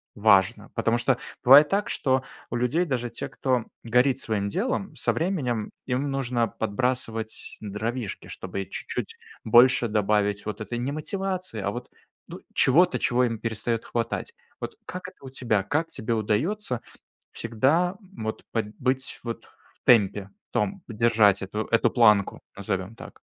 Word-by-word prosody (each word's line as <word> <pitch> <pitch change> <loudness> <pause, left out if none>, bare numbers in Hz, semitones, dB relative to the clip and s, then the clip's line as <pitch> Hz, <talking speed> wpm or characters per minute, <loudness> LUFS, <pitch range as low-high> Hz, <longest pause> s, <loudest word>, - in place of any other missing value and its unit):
важно? 105 0 +3
Потому 115 0 +2
что 125 +1 +2 0.3
бывает 140 +4 +9
так, 200 +1 0
что 130 -1 +1 0.3
у - - -3
людей, 125 +9 +1
даже 125 -6 -2
те, 115 - -6
кто 125 0 0 0.2
горит 125 +3 +3
своим 105 -3 -1
делом, 200 - -2
со - - 0
временем 135 - -1 0.2
им 135 +2 -1
нужно 125 -4 0
подбрасывать 115 0 -2
дровишки, 110 +2 -4
чтобы 95 +1 -5
чуть-чуть - - -5 0.3
больше 120 +2 +6
добавить 105 -1 +1
вот 105 0 -4
этой 120 +3 -4
не 125 +3 -2
мотивации, 185 - -3
а 100 - -1
вот, 120 +3 -7 0.4
ну, - - -8
чего-то, 175 +7 +4
чего 125 0 +2
им 115 -3 -1
перестает 115 0 -2
хватать. 115 - -3 0.3
Вот 450 - -5
как 180 0 -6
это - - -25
у - - -7
тебя? 115 -6 0
Как 155 - 0
тебе 110 +2 -3
удается 120 - -1 0.5
всегда 140 - +1 0.2
вот 110 0 -4
под 110 -2 -2
быть 130 0 -1
вот 115 -1 -5
в - - -28
темпе, 100 -4 +4 0.2
в - - -58
том 195 -1 -1
держать 110 -4 +3
эту 105 +3 -3
эту 115 - +3
планку, 105 -5 +4 0.2
назовем 95 +1 -3
так? - - -12
120 Hz, 150 wpm, -26 LUFS, 110-135 Hz, 0.5 s, бывает